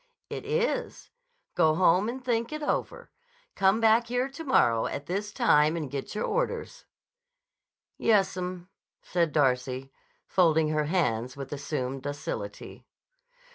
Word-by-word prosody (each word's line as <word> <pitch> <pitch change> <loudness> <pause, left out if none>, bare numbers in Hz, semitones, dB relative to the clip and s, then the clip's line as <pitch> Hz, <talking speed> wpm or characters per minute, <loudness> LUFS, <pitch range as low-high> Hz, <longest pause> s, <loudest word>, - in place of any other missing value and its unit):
"It - - -5
is. 475 +2 -2 0.4
Go 155 -1 +3
home 185 +4 +3
and 255 +1 -6
think 235 0 0
it 305 0 -5
over. 480 +10 -3 0.4
Come 195 +2 +3
back 225 +1 +4
here 245 +2 0
to 290 +4 -8
morrow 120 - +3
at 140 - -5
this 200 +5 -3
time 155 - +3
and 150 -5 -4
get 140 +8 -5
your 210 - -1
orders." - - -2 1.1
"Yessum," 185 -4 +1 0.4
said 170 -3 0
Darcy, 130 -2 0 0.3
folding 160 -4 +3
her 155 -1 0
hands 130 -7 0
with 135 0 -6
assumed 135 -2 -3
docility. 145 +1 -6
180 Hz, 130 wpm, -28 LUFS, 145-235 Hz, 1.1 s, back